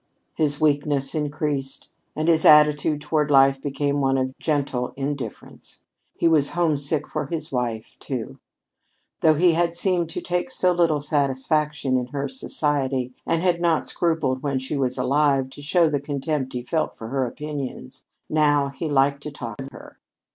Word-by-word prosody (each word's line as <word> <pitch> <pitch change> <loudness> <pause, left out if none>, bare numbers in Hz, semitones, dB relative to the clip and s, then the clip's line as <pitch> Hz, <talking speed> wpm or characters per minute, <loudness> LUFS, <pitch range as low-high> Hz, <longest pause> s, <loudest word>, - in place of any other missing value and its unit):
His 145 -2 0
weakness 145 -2 +1
increased, 145 -3 -3 0.3
and 155 +1 -1
his 160 -2 +4
attitude 150 0 +5
toward 150 0 0
life 135 -1 +5
became 145 0 -1
one 135 0 +2
of 130 0 -2
gentle 140 -5 -1
indifference. 135 -4 -6 0.3
He - - +2
was 150 -4 +3
homesick 150 -3 0
for - - -3
his 165 -2 -5
wife, 120 -4 -3
too. - - -5 0.8
Though 155 -1 +4
he 175 +3 +4
had 170 +1 +1
seemed 175 -2 +1
to - - -4
take 180 +6 -2
so 185 -8 +2
little 170 -4 +2
satisfaction 145 -1 0
in 125 -1 -2
her 140 +2 -3
society, 140 - -2
and 165 +1 +1
had 175 -2 +1
not 170 -2 +1
scrupled 160 -7 0
when 140 -2 -1
she 130 +3 -4
was 130 -2 -1
alive 135 0 +2
to 145 - -11
show 165 +3 +3
the 145 -3 -1
contempt 145 -1 -3
he 125 -1 -4
felt 155 +5 -2
for 110 - -7
her 135 0 0
opinions, 145 - -7 0.2
now 145 -2 +2
he 155 +3 -5
liked 140 0 +2
to 150 - -6
talk 120 -3 -7
of 135 - -7
her. - - -13
145 Hz, 165 wpm, -23 LUFS, 135-155 Hz, 0.8 s, attitude